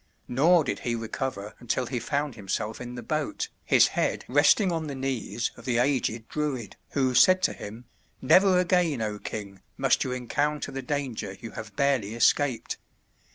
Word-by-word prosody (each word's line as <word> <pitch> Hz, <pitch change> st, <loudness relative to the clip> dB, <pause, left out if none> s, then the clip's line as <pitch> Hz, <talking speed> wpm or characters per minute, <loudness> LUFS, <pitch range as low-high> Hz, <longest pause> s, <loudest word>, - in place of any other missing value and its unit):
Nor 160 Hz, +7 st, +4 dB
did -, -, -3 dB
he 120 Hz, -1 st, -2 dB
recover 115 Hz, -2 st, -4 dB
until 125 Hz, +1 st, -1 dB
he 125 Hz, 0 st, -3 dB
found 140 Hz, +4 st, -2 dB
himself 105 Hz, +1 st, -4 dB
in 125 Hz, 0 st, -7 dB
the 120 Hz, -, -7 dB
boat, 285 Hz, -, -2 dB
his -, -, +5 dB
head -, -, -1 dB
resting 195 Hz, -4 st, +4 dB
on 165 Hz, -2 st, -2 dB
the 140 Hz, -, -5 dB
knees 130 Hz, -3 st, -2 dB
of 115 Hz, -, -13 dB
the 120 Hz, -1 st, 0 dB
aged 120 Hz, -3 st, 0 dB
Druid, 145 Hz, -7 st, -3 dB, 0.2 s
who 130 Hz, -2 st, +1 dB
said 185 Hz, +9 st, +6 dB
to -, -, +2 dB
him, 110 Hz, +4 st, -9 dB, 0.3 s
"Never 185 Hz, +7 st, +5 dB
again, 180 Hz, -6 st, +2 dB
O 105 Hz, -1 st, -3 dB
king! 100 Hz, -3 st, -7 dB, 0.2 s
must -, -, +2 dB
you 130 Hz, -, -3 dB
encounter 145 Hz, +4 st, -1 dB
the 135 Hz, -, -4 dB
danger 125 Hz, -8 st, -3 dB
you 115 Hz, -, -8 dB
have 110 Hz, -2 st, -8 dB
barely 130 Hz, -6 st, +1 dB
escaped. 120 Hz, +1 st, +2 dB
125 Hz, 170 wpm, -27 LUFS, 115-145 Hz, 0.3 s, said